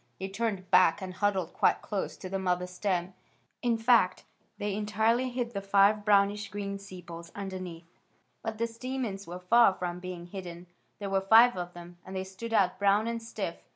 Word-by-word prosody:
They 190 +1 -4
turned 200 -3 -3
back 180 0 +5
and 185 -2 -6
huddled 190 -4 0
quite - - +2
close 205 -2 -3
to - - -7
the 195 +1 -3
mother 180 -1 0
stem. 180 0 -2 0.5
In 235 -2 +1
fact, 225 -5 +3 0.3
they 205 -1 -2
entirely 220 +5 +1
hid 245 -1 -3
the 200 - -3
five 200 +1 +4
brownish 205 0 +3
green 200 0 -4
sepals 175 -3 -10
underneath. 185 -4 -6 0.6
But 225 -1 -4
the 230 - +1
stamens 230 -4 -4
were 175 +1 -6
far 200 +2 +5
from 180 -1 -4
being 180 -1 -7
hidden. 175 -1 -8 0.3
There 200 -1 -5
were 195 0 +2
five 225 +5 +7
of 175 -1 -5
them, 175 0 -11
and 190 - -9
they 190 - -2
stood 190 +5 -8
out 195 -5 +2
brown 200 +2 +3
and 230 0 -2
stiff. 215 -6 -5
195 Hz, 185 wpm, -29 LUFS, 180-215 Hz, 0.6 s, five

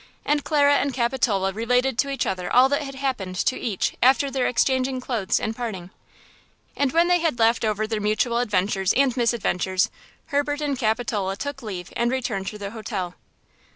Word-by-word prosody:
And 295 -1 +1
Clara 285 -2 +4
and 280 -3 -1
Capitola 235 -6 +1
related 250 +3 +1
to 280 - +2
each 275 - -1
other 180 -1 -3
all 255 +2 +6
that 285 +1 +1
had 275 -2 -7
happened 255 -9 -3
to 220 - +1
each 210 -6 -2
after 270 +2 +4
their 265 -1 0
exchanging 260 +1 +1
clothes 235 -6 -1
and 220 0 -3
parting. 195 -7 -5 0.8
And 280 -2 +1
when 335 +3 +3
they 355 0 +3
had 325 -7 0
laughed 230 0 +3
over 215 -1 0
their 215 -1 -3
mutual 215 +3 +1
adventures 195 -4 +1
and 265 -2 +3
misadventures, 220 -4 0 0.4
Herbert 290 0 0
and 290 -2 -1
Capitola 220 -5 -1
took 285 +5 -5
leave 190 -5 -7
and 235 0 +1
returned 240 -7 -2
to 210 - -5
their 200 -1 -6
hotel. 205 -5 -4
235 Hz, 180 wpm, -24 LUFS, 205-270 Hz, 0.8 s, all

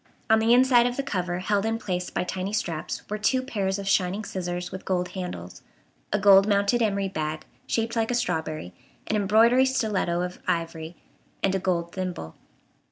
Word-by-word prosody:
On 220 - +6
the 225 +1 +2
inside 245 -1 +6
of 245 - -3
the 275 - -1
cover, 180 -8 -2
held 200 +2 0
in 225 +1 0
place 180 -4 -3
by - - -2
tiny 190 +2 -4
straps, 165 -7 -3
were 210 +1 -4
two 255 +4 +1
pairs 200 -7 -1
of 200 -1 -6
shining 195 +2 +1
scissors 180 -2 -4
with 190 - -7
gold 180 -1 -1
handles, 90 - -7 0.5
a 210 - +2
gold 195 0 +6
mounted 205 +3 +2
emery 200 -3 +1
bag, 155 -4 -4 0.2
shaped 230 0 -1
like 225 -1 0
a 245 - +1
strawberry, 160 - -2 0.3
an 220 - -1
embroidery 220 +5 +4
stiletto 210 -9 0
of 180 0 -4
ivory, 165 0 -2 0.5
and 195 - +2
a 195 - +1
gold 175 -2 -1
thimble. 180 - -5
195 Hz, 180 wpm, -26 LUFS, 180-220 Hz, 0.5 s, On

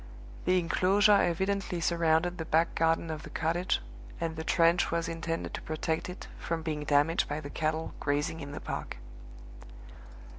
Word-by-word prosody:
The 185 0 +4
inclosure 190 +4 +3
evidently 190 +1 0
surrounded 170 +1 +2
the 160 - -3
back 160 +2 +2
garden 165 0 +1
of 155 -1 -5
the - - -10
cottage, 170 +3 0 0.4
and 165 -1 -2
the 160 - -4
trench 170 +1 +3
was 170 0 -1
intended 165 0 -3
to - - -4
protect 160 +2 -2
it 180 - -8
from 165 -1 -3
being 150 -2 -3
damaged 145 +3 +2
by 150 +1 -2
the 145 -2 -8
cattle 160 0 -1
grazing 145 +2 -1
in 140 -2 -7
the 145 - -5
park. - - -5
165 Hz, 160 wpm, -30 LUFS, 160-170 Hz, 0.4 s, The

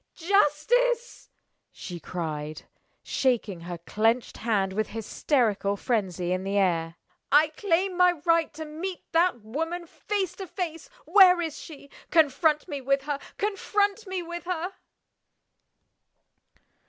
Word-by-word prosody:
"Justice!" 410 +8 +1 0.4
she 175 -2 -8
cried, 155 -2 -5 0.4
shaking 235 -8 0
her 175 +1 -6
clinched 225 +8 0
hand 200 -4 0
with 215 +1 -1
hysterical 220 -2 0
frenzy 190 -7 -1
in 185 +1 -1
the 195 +1 -1
air. 165 -4 +1 0.4
"I 300 +2 +6
claim 365 +2 0
my 360 0 +5
right 335 -1 +3
to 315 +1 -6
meet 335 +5 -6
that 335 -7 +2
woman 325 +10 -3
face 390 +2 -3
to 385 - -6
face! 345 +5 -5 0.2
Where 370 -3 +7
is 325 -3 -3
she? 285 -3 -12 0.2
Confront 305 0 +3
me 285 -2 -5
with 275 +1 +1
her! 290 -1 -2 0.2
Confront 410 +1 0
me 375 -1 -3
with 345 0 -7
her!" 360 +1 -3
300 Hz, 125 wpm, -27 LUFS, -, 0.4 s, Where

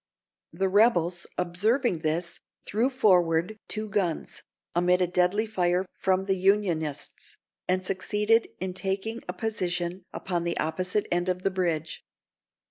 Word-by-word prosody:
The 190 +4 0
rebels 185 -4 +3
observing 195 - +1
this, 165 +2 -2 0.3
threw 230 +6 +1
forward 185 -5 +2
two 215 0 -3
guns, 175 -6 -2 0.3
amid 180 +1 +3
a 180 - +3
deadly 180 +4 +2
fire 180 -3 +1
from 190 0 +1
the 195 0 +1
Unionists, 180 -6 0 0.3
and 185 0 +1
succeeded 210 +4 +1
in 185 0 -3
taking 195 +5 -3
a - - -3
position 180 -5 -2
upon 175 -2 -2
the 170 0 -2
opposite 180 +6 -1
end 175 +1 +1
of 180 0 -2
the 195 - +1
bridge. 170 -4 -2
185 Hz, 130 wpm, -27 LUFS, 175-205 Hz, 0.3 s, rebels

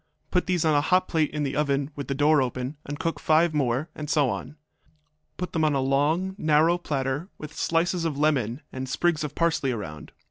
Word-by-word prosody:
Put 180 - +1
these 180 -3 +1
on 155 - +4
a 145 - +4
hot 185 +4 +2
plate 160 -3 +1
in 150 -1 -3
the 135 -1 -2
oven 140 0 0
with 140 - -5
the 140 - -2
door 145 +1 +4
open, 130 +2 -3
and 145 +1 -4
cook 165 +2 -2
five 160 +1 +3
more, 135 0 0
and 150 -1 -7
so 145 -5 +3
on. 140 +4 -6 0.8
Put 180 -1 -4
them 160 - +1
on 150 -2 +2
a - - +2
long, 145 +8 +1
narrow 160 +3 +3
platter, 140 +2 -2
with 155 -1 -9
slices 170 +1 0
of 160 -4 -1
lemon 140 -4 +1
and 130 0 -5
sprigs 170 +2 +1
of 150 -1 -5
parsley 160 -5 +1
around. 75 -10 -6
150 Hz, 210 wpm, -26 LUFS, 135-165 Hz, 0.8 s, on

